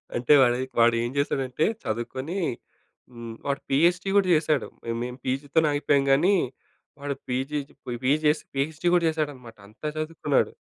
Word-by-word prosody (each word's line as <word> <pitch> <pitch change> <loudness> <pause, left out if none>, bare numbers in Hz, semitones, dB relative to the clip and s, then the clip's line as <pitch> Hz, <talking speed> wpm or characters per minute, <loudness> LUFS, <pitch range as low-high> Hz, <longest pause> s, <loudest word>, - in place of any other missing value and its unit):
అంటే 120 +5 +3
వాడే 125 -1 +3 0.2
వాడేం 115 +1 +3
చేసాడంటే 135 0 0 0.2
చదువుకొని 130 - -4 0.7
హ్మ్. 115 -1 -8
వాడు 140 -1 -1
పీహెచ్‌డీ 175 +7 +2
కూడా 195 -2 +3
చేశాడు. 155 -2 +1 0.4
మేము 125 +1 -6
పీజీతోనే 140 +4 +1
ఆగిపోయాము 145 -1 +2
కానీ 175 +9 +4 0.7
వాడు 140 -1 -3
పీజీ 135 +4 -1 0.3
పోయి 120 -1 -4
పీజీ 145 +4 +3
చేసి 150 +1 +2
పీహెచ్‌డీ 155 +5 -1
కూడా 175 - +3
చేసాడన్నమాట. 145 -8 -4
అంత 110 +4 -22 0.2
చదువుకున్నాడు. 155 -2 0
140 Hz, 135 wpm, -25 LUFS, 125-155 Hz, 0.7 s, కానీ